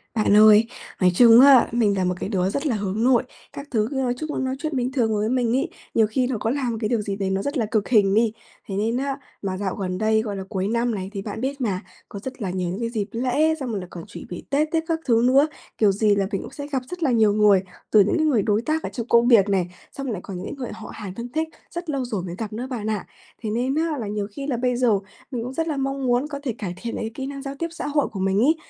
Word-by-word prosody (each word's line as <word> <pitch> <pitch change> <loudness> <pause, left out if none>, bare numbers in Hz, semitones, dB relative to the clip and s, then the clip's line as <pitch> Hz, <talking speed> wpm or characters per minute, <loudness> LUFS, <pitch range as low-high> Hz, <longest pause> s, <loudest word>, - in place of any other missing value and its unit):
Bạn 210 -2 +3
ơi, 215 +1 +7 0.3
nói 180 - +5
chung 230 +2 +8
á, 270 -3 +8
mình 215 -4 +2
là 185 - +1
một 180 0 +1
cái - - -3
đứa 190 -3 +1
rất 280 +9 -2
là 240 - +1
hướng 205 +1 -2
nội, 250 -1 +4 0.3
các 280 +1 -8
thứ 220 -2 +1
cứ - - -4
nói 260 -2 +1
chung 310 +3 -4
là - - -2
nói 260 0 -1
chuyện 310 -1 -3
bình 250 0 0
thường 235 -5 +1
với 210 +1 0
mình 245 -2 +1
ấy, 295 +6 -1 0.2
nhiều 220 -1 +4
khi 250 +3 0
nó 255 -3 -1
có 220 - -1
là 260 0 -1
một 230 - -2
cái 215 - 0
điều 235 -3 +1
gì 200 -1 -3
đấy 195 -1 -2
nó 190 0 0
rất 285 +7 -2
là 230 - +1
cực 210 -1 -1
hình 205 -5 +4
đi. 225 +1 +3 0.4
Thế 195 - -4
nên 225 +4 0
á 275 +1 -2 0.2
mà 190 -2 -3
dạo 190 -1 -2
gần 185 -2 -3
đây, 220 +1 +2
gọi 210 -2 -4
là, 190 - -4
cuối 190 -2 -1
năm 235 +1 0
này 190 -1 -4
thì 200 - -4
bạn 210 +2 -6
biết 275 +1 -3
mà, 195 -6 -1 0.3
có 200 - -7
rất 260 +4 -8
là 195 - -2
nhiều 180 -1 -2
những 185 +4 -4
cái 230 -1 -1
dịp 215 -4 -2
lễ 260 +7 +1
xong 265 -3 -4
rồi 210 - -2
lại 180 - -7
còn 170 - -8
chỉ 205 - -9
bị 175 - -7
Tết 290 +2 +2
tiếc 325 -1 +1
các 330 -1 0
thứ 230 -3 +3
nữa, 275 +4 +5 0.3
kiểu 210 -2 +4
gì 205 +1 +2
là 195 -1 0
mình 195 - -1
cũng - - -9
sẽ 285 -1 -7
gặp 275 -3 -1
rất 360 -1 -5
là 275 - +3
nhiều 220 -3 +4
người, 210 -2 +5 0.3
từ 215 - +6
những 205 - +1
cái 315 - +2
người 265 -8 +3
đối 210 +2 +1
tác 310 +6 -1
ở - - -3
trong 235 -2 -5
công 235 0 +4
việc 215 -5 +6
này, 190 -3 +1 0.2
xong 275 - -6
rồi 250 - -2
lại 190 - -5
còn 195 -3 -6
những 180 - -6
cái - - -5
người 250 -3 -5
họ 220 - -9
hàng 205 -4 -7
thân 235 +2 -6
thích, 320 +1 -1 0.2
rất 345 -1 -6
lâu 275 -4 -1
rồi 210 -7 -3
mới 175 -1 -5
gặp 215 -2 -5
nữa 240 +4 -4
bạn 220 -5 -3
ạ. 210 -3 -2 0.4
Thế 220 - -3
nên 245 +5 0
á 320 -1 0
là 220 - -4
nhiều 205 -1 -2
khi 275 +6 -6
là 260 -5 0
bây 250 +1 0
giờ 240 -5 +3 0.3
mình 240 -3 -3
cũng 250 +2 -5
rất 325 +4 -1
là 305 -3 -2
mong 275 0 -2
muốn 245 +3 +2
có 285 -2 -6
thể 255 -5 -1
cải 185 -5 -4
thiện 235 -1 -4
lại - - -3
cái 220 - -4
kỹ 265 +2 -5
năng 275 0 -6
giao 275 0 -6
tiếp 335 +4 -2
xã 335 - -5
hội 290 -1 +1
của 195 - -7
mình 195 +1 +1
ấy, 290 +8 +4
230 Hz, 310 wpm, -23 LUFS, 205-265 Hz, 0.4 s, chung